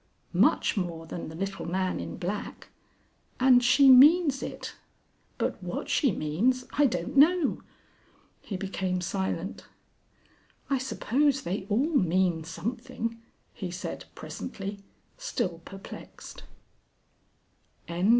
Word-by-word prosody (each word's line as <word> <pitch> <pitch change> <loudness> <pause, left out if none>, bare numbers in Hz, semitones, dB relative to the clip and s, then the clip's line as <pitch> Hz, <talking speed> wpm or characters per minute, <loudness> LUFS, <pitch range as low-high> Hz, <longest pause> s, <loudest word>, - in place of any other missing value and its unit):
_ - - -41 0.3
Much - - +3
more 170 -5 -3
than 165 0 -6
the 160 - -9
little 195 0 -4
man 185 +1 -1
in - - -6
black. 195 +4 -5 0.7
And 250 -1 +6
she 270 +3 +6
means 280 +2 +7
it. - - -6 0.6
But - - -2
what - - -5
she 275 -6 +3
means 210 +12 0
I 290 -1 +4
don't 240 - -3
know!..." 315 +2 +4 0.8
He 195 - -5
became 190 -1 -2
silent. 190 0 -3 1.0
"I 270 - +3
suppose 270 +3 +1
they 190 0 -3
all 265 +11 +1
mean 180 - +2
something,", 230 +6 -5 0.3
he 185 - -5
said, 180 +1 -6
presently, 200 -4 -6 0.4
still 180 - -2
perplexed. 195 0 -10 1.4
XXV. 175 +4 0
205 Hz, 115 wpm, -28 LUFS, 180-260 Hz, 1.4 s, means